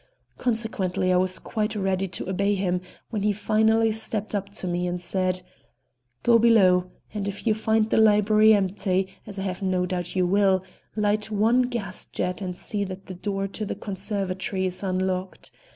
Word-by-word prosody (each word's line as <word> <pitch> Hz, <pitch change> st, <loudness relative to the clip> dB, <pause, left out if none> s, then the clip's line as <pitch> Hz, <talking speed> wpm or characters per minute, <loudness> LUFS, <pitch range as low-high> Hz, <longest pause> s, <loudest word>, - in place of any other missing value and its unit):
Consequently 215 Hz, -6 st, 0 dB
I -, -, +4 dB
was 185 Hz, 0 st, +1 dB
quite 215 Hz, 0 st, -2 dB
ready 195 Hz, -1 st, 0 dB
to 180 Hz, -, -6 dB
obey 200 Hz, +2 st, +1 dB
him 180 Hz, -2 st, 0 dB, 0.3 s
when 215 Hz, -3 st, -2 dB
he 210 Hz, +1 st, +2 dB
finally 220 Hz, +2 st, +2 dB
stepped 220 Hz, -1 st, -4 dB
up 200 Hz, -1 st, -2 dB
to 200 Hz, -, -5 dB
me 180 Hz, 0 st, -1 dB
and 175 Hz, 0 st, -2 dB
said: 185 Hz, 0 st, -1 dB, 0.8 s
"Go 235 Hz, -1 st, +6 dB
below, 185 Hz, -6 st, +5 dB, 0.2 s
and 205 Hz, -2 st, -3 dB
if 200 Hz, +3 st, -5 dB
you 220 Hz, -, +4 dB
find 220 Hz, 0 st, +1 dB
the -, -, +3 dB
library 215 Hz, 0 st, +5 dB
empty, 190 Hz, -2 st, +1 dB, 0.2 s
as 200 Hz, -, -7 dB
I 195 Hz, -, -3 dB
have 185 Hz, -1 st, -3 dB
no 185 Hz, -1 st, +1 dB
doubt 180 Hz, 0 st, -3 dB
you 185 Hz, -1 st, +3 dB
will, 190 Hz, 0 st, +3 dB, 0.3 s
light 210 Hz, 0 st, +1 dB
one 220 Hz, +4 st, +3 dB
gas 235 Hz, -7 st, -3 dB
jet 180 Hz, +2 st, -3 dB
and 180 Hz, -2 st, -4 dB
see 205 Hz, -1 st, -2 dB
that 190 Hz, 0 st, -8 dB
the 185 Hz, -, -7 dB
door 195 Hz, +1 st, -2 dB
to 215 Hz, -, -5 dB
the 210 Hz, -, -3 dB
conservatory 195 Hz, -1 st, -3 dB
is 185 Hz, -1 st, -3 dB
unlocked. 185 Hz, -1 st, -2 dB
195 Hz, 180 wpm, -25 LUFS, 185-215 Hz, 0.8 s, Go